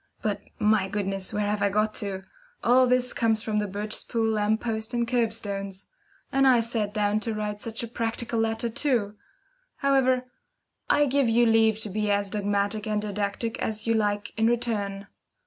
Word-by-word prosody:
But, 210 -2 -1 0.2
my 210 -2 +3
goodness, 195 -1 -2
where 210 0 -1
have 210 0 -1
I 200 - +3
got 215 +2 +1
to? 195 -2 -4 0.4
All 255 +2 +5
this 250 0 +2
comes 225 -1 +1
from 215 -1 0
the 210 - -1
Birchespool 215 +3 -2
lamp 215 +1 +1
posts 225 0 -2
and 235 -1 0
curb 235 -2 +1
stones. 200 -3 -5 0.5
And 270 0 +4
I 250 -2 +6
sat 225 -3 -1
down 210 0 +1
to 220 0 -3
write 210 -1 -3
such 230 +1 -4
a - - -3
practical 230 0 -2
letter 225 +1 0
too! 230 -4 0 0.6
However, 260 -2 +2 0.6
I 295 - +4
give 275 -2 +2
you 235 +1 +4
leave 225 -1 +4
to 215 - -3
be 210 +1 -1
as 200 -1 +1
dogmatic 205 +1 -1
and 210 -1 0
didactic 210 +2 -2
as 215 0 -2
you 230 - +2
like 205 -2 0
in 225 0 +3
return. 210 -4 -1
220 Hz, 180 wpm, -26 LUFS, 205-230 Hz, 0.6 s, I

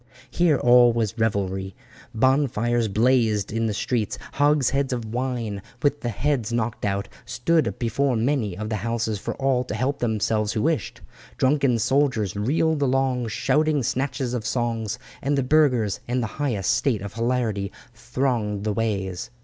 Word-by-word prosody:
Here 170 -5 +3
all 120 0 +6
was 115 -1 -2
revelry. 95 -3 -1 0.4
Bonfires 120 -2 +2
blazed 110 -1 +2
in 115 0 0
the - - -1
streets. 110 -1 -1 0.2
Hogsheads 140 -2 +2
of 120 -3 -2
wine, 120 -5 -2 0.2
with 145 0 +1
the 120 - -2
heads 120 0 -1
knocked 115 -2 -2
out, 100 0 -1 0.2
stood 160 +5 0
before 125 +2 0
many 115 -5 0
of 105 +1 -4
the 110 - -1
houses 110 0 -2
for - - -4
all 135 -2 +1
to 105 - -4
help 130 +5 -1
themselves 110 -2 0
who 110 - -1
wished. 160 -1 -1 0.4
Drunken 135 -2 +2
soldiers 115 -5 +1
reeled 145 +8 +1
along 130 -2 +1
shouting 150 +6 +1
snatches 130 0 -2
of 120 -3 -2
songs, 115 -2 -2 0.2
and 140 +1 0
the 135 - +1
burghers 125 -7 +2
in 125 +1 0
the 120 - -1 0.2
highest 115 -10 0
state 115 -9 0
of 100 - -7
hilarity 115 -4 -1 0.2
thronged 115 -4 -2
the 105 -1 0
ways. 100 -4 -2
120 Hz, 155 wpm, -24 LUFS, 110-135 Hz, 0.4 s, all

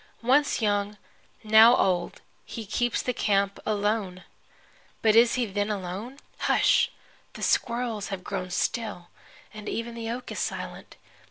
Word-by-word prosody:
Once 265 0 +2
young, 205 0 0 0.5
now 220 +2 +7
old, 180 -5 0 0.2
he 225 -2 -7
keeps 240 +3 -1
the 250 - -1
camp 200 -3 0
alone! 205 -3 -1 0.8
But 220 -1 +4
is 235 +1 +6
he 250 -1 +1
then 205 0 -2
alone? 205 +6 -5 0.2
Hush! - - +3 0.4
The - - -8
squirrels 235 -3 0
have 195 -2 -6
grown 185 -2 -4
still, 180 -1 -2 0.4
and 215 -1 -7
even 230 +1 -4
the 230 -1 -5
oak 245 +2 -5
is - - -4
silent. - - -5
215 Hz, 140 wpm, -26 LUFS, 200-235 Hz, 0.8 s, now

